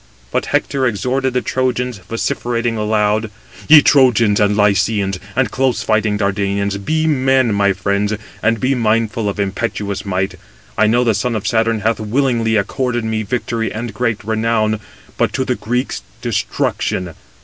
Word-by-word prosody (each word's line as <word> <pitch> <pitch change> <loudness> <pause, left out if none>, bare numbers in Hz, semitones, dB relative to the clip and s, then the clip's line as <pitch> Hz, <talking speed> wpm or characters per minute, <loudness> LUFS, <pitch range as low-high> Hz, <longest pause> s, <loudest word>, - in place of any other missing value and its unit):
But - - -1
Hector 135 -2 0
exhorted 130 +4 -1
the 125 - +1
Trojans, 125 -3 -1
vociferating 115 +3 -2
aloud: 105 0 +1 0.4
"Ye 150 -1 +9
Trojans 120 -7 +4
and 105 0 +2
Lycians, 100 -1 +1 0.2
and 130 -4 +1
close 130 -2 0
fighting 110 -1 +1
Dardanians, 100 0 -1
be 155 +6 0
men, 130 -5 +2
my 100 -1 +2
friends, 100 +2 -1 0.3
and 115 0 +1
be 130 +5 +1
mindful 115 -2 0
of 100 - -5
impetuous 100 0 -2
might! 95 -1 -2 0.4
I 110 - +3
know 120 +3 +3
the 115 -2 +2
son 115 +3 -1
of 105 - -3
Saturn 115 -1 +1
hath 110 +1 0
willingly 115 0 +1
accorded 120 +3 -1
me 110 0 -1
victory 115 0 -2
and 110 0 -5
great 115 0 -1
renown, 110 -1 0 0.4
but - - +1
to 130 - -1
the 125 - 0
Greeks 125 +3 -2 0.2
destruction. 90 -3 -1
110 Hz, 150 wpm, -17 LUFS, 105-125 Hz, 0.4 s, Ye